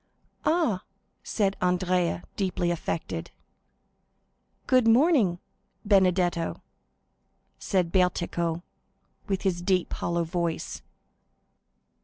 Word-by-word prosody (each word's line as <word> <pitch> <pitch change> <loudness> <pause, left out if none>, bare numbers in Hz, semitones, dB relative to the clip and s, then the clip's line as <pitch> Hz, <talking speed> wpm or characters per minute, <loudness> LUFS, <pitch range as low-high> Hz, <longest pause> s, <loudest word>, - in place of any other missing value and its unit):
"Ah," 310 - +2 0.4
said 200 -3 0
Andrea, 180 -1 +1
deeply 180 -3 0
affected. 165 0 -3 1.4
"Good 255 -3 +4
morning, 235 - +4 0.5
Benedetto," 180 -4 +2 1.0
said 180 -3 0
Bertuccio, 170 -2 0 0.6
with 195 -2 -1
his 180 -3 0
deep, 180 -1 +1
hollow 170 0 -1
voice. 170 -1 -3
180 Hz, 75 wpm, -27 LUFS, 170-195 Hz, 1.4 s, Good